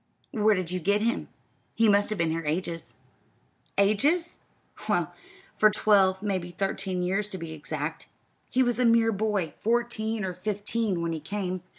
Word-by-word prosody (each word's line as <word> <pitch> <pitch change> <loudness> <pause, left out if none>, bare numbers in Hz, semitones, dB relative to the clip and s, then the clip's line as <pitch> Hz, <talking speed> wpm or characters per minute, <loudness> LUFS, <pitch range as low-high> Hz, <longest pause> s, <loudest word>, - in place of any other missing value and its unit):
"Where 215 -5 +3
did 185 -2 -2
you 185 - -1
get 200 +5 +1
him? 235 +2 0 0.5
He 225 - +4
must 205 0 +4
have 215 - -2
been 165 -2 +1
here 165 +1 -2
ages." 165 +2 -3 0.8
"Ages? 280 - +2 0.5
Well, - - +1 0.4
for 215 - +6
twelve 195 -2 +3
maybe 185 -4 -1
thirteen 185 0 -2
years, 195 +3 0
to 190 - -5
be 165 -2 -6
exact. 155 0 -5 0.4
He 260 - +3
was 245 -1 0
a 250 - +3
mere 230 -1 +5
boy, 200 -6 -1
fourteen 225 -2 0
or 185 - -3
fifteen, 205 0 -2
when 165 0 -1
he 160 - -3
came. 185 +2 -3
200 Hz, 165 wpm, -27 LUFS, 180-220 Hz, 0.8 s, for